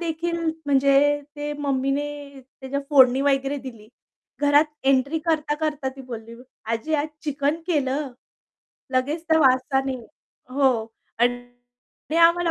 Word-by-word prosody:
देखील 335 0 -2 0.3
म्हणजे 275 0 +4 0.4
ते 295 0 -3
मम्मीने 275 0 0 0.3
त्याच्या 265 +2 -6
फोडणी 260 -2 +6
वगैरे 275 0 +1
दिली. 230 -5 -10 0.5
घरात 290 +1 +5 0.2
एंट्री 275 +4 +2
करता-करता 300 -3 -1
ती - - -9
बोलली, 230 -2 -8 0.3
"आजी 230 +8 -2
आज 295 0 +1 0.2
चिकन 290 +2 -1
केलं?" 285 -4 0 0.8
लगेच 290 +6 0
त्या 320 0 +4
वासानी 265 0 +2 0.5
हो 275 +2 -2 0.6
आणि 245 +1 +2 0.7
दे 325 - 0
आम्हाला 340 0 +5
280 Hz, 115 wpm, -23 LUFS, 260-305 Hz, 0.8 s, फोडणी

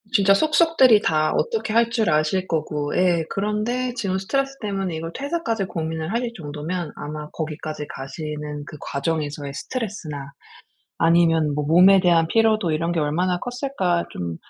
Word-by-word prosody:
진짜 195 0 +5
속속들이 305 -3 +5
다 155 -4 +1
어떻게 450 - -1
할 230 0 +4
줄 225 -5 +1
아실 155 +4 +1
거고 150 -2 -2
예 175 -2 +3
그런데 215 +5 -1
지금 195 -5 -1
스트레스 275 +8 -1
때문에 195 -5 -2
이걸 165 +1 -5
퇴사까지 275 - -2
고민을 160 -1 -4
하실 235 0 -1
정도면 155 +1 -5
아마 150 0 -6
거기까지 155 -1 -5
가시는 150 +1 -6
그 150 - -10
과정에서의 145 -1 -3
스트레스나 195 - -5 0.8
아니면 165 -2 +3
뭐 150 - -1
몸에 180 +5 +7
대한 170 -3 +4
피로도 220 -3 +2
이런 165 +2 0
게 170 - 0
얼마나 175 +5 0
컸을까? 245 -9 -1
좀 85 -2 -4
175 Hz, 350 characters per minute, -23 LUFS, 155-215 Hz, 0.8 s, 몸에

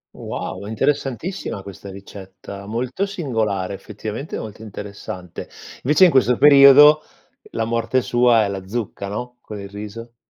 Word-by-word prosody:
Wow, 95 +2 -6
interessantissima 135 - -2
questa 100 0 -10
ricetta, 100 0 -10
molto 125 - -2
singolare, 110 - -2
effettivamente 110 +7 -7
molto 110 -1 -8
interessante. 100 -3 -8 0.4
Invece 150 +7 +4
in 180 - +7
questo 125 -3 +3
periodo 145 +1 +8 0.5
la 115 - -2
morte 115 +3 0
sua 120 -2 +3
è 100 - -1
la 95 -1 -6
zucca, 105 -2 -4
no, 125 +5 -6
con 105 -3 -9
il 100 - -9
riso. 105 +3 -9
110 Hz, 135 wpm, -21 LUFS, 100-130 Hz, 0.5 s, periodo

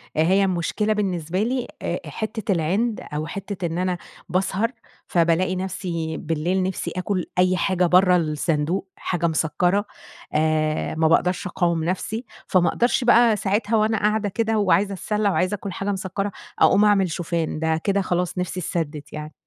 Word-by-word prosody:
هيّ 185 +6 +3
المشكلة 190 +4 0
بالنسبة 185 -3 -1
لي 250 +2 -1
آآ - - -2
حتّة 220 -1 -3
العند 195 +7 0
أو 155 +1 -2
حتّة 195 0 -5
إن 165 0 -2
أنا 180 0 0 0.3
باسهر، 190 +5 0 0.4
فبالاقي 170 +2 +2
نفسي 175 -4 -3
بالليل 170 +4 -1
نفسي 185 0 -3
آكل 185 0 -1
أي 185 0 +4
حاجة 180 0 +1
برّه 180 +1 +5
الصندوق، 160 +3 -1
حاجة 170 -2 -1
مسكرة، 175 +5 +1 0.5
آآ، 155 0 +1
ما 160 0 +3
باقدرش 180 +3 +2
أقاوم 170 -2 0
نفسي، 205 +7 -2 0.2
فما 180 -2 +3
أقدرش 240 +1 +1
بقى 240 -2 +5
ساعتها 205 +2 0
وأنا 220 +1 +2
قاعدة 210 0 +1
كده 225 +2 0
وعايزة 200 0 +2
أَتسلَّى 210 +3 0
وعايزة 185 +1 +1
آكل 200 0 -6
حاجة 195 +3 -2
مسكرة 195 +1 -3 0.3
أقوم 205 +2 +5
أعمل 195 -4 +3
شوفان 165 -2 -2
ده 160 0 +1
كده 200 0 +2
خلاص 180 -1 -1
نفسي 180 0 -2
اتسدت 155 -4 -4
يعني. 150 0 -6
185 Hz, 155 wpm, -23 LUFS, 165-205 Hz, 0.5 s, برّه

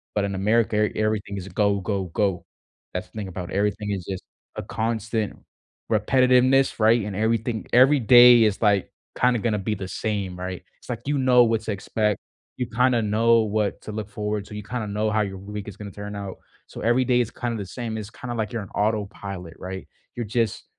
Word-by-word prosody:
But 105 - +1
in 100 -1 -3
America, 105 +3 +2
er 105 -1 +2
everything 110 -2 -1
is 95 -1 -6
a - - -10
go, 100 +1 +2
go, 100 -1 -2
go. 95 +1 -1 0.5
That's 90 0 -4
the - - -34
thing 105 -2 -4
about 90 0 -6
everything 105 +1 -1
is 95 -4 -3
just 95 -2 -5 0.3
a - - -3
constant 110 -1 -2 0.6
repetitiveness, 130 0 +4
right? 110 +1 +4
And 105 -2 -5
everything 110 +1 -1
every 135 +4 +6
day 120 0 +8
is, 105 -3 +1
like, 100 -3 +2 0.3
kinda 125 -1 +3
gonna 110 -1 0
be 100 +3 -1
the 95 -2 -6
same, 100 -2 -3
right? 90 0 -5 0.2
It's - - -18
like, - - -3
you 145 0 +1
know, 125 -2 +5
what 115 -1 +1
to 110 - -3
expect. 105 +1 -1 0.4
You 125 - -2
kinda 125 +1 +2
know 115 +2 +3
what 105 -1 -1
to - - -6
look 105 -1 -5
forward 105 -1 -3
to, 105 - -10
you 105 - -5
kinda 115 +1 -4
know 105 +1 -1
how 110 0 +2
your 95 -2 -3
week 105 +1 -7
is 100 - -11
gonna 105 -1 -7
turn 105 +1 -7
out, 100 -2 -6 0.3
so - - -9
every 120 +3 +3
day 125 -1 +3
is 115 -2 -3
kinda 120 -2 -3
the 100 - -4
same. 115 +1 -5
It's 110 0 -7
kinda 120 +2 -6
like 110 0 -3
you're 115 - -2
on 100 - -12
autopilot, 100 -4 -2
right? 95 +1 -7 0.3
You're 120 - -3
just 115 -1 -1
105 Hz, 215 wpm, -24 LUFS, 100-115 Hz, 0.6 s, day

